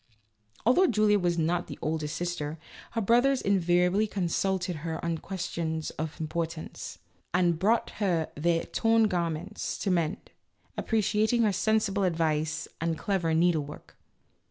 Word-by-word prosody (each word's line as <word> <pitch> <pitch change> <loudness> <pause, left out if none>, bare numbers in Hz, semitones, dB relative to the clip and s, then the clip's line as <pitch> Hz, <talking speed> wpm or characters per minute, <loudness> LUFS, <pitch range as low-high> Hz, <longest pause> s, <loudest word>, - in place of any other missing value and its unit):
Although 305 +11 +5
Julia 210 -4 +3
was 175 -2 0
not 170 +2 0
the - - -7
oldest 155 0 -2
sister, 165 -3 -3 0.4
her 230 - 0
brothers 245 +6 +4
invariably 180 +1 +2
consulted 185 -1 -1
her 160 +1 -4
on 165 -1 -1
questions 165 -4 -3
of 160 +1 -5
importance, 160 0 -4 0.4
and 175 -3 +2
brought 220 +5 +2
her 170 -5 +1
their 165 +2 +1
torn 225 0 +2
garments 175 +2 -2
to 195 - -1
mend, 170 -1 -1 0.4
appreciating 220 +1 +1
her 210 -2 +2
sensible 215 -1 +1
advice 160 -3 0
and 165 -1 0
clever 175 -5 0
needle 165 -2 +3
work. 145 +1 -11
175 Hz, 130 wpm, -28 LUFS, 160-205 Hz, 0.4 s, Although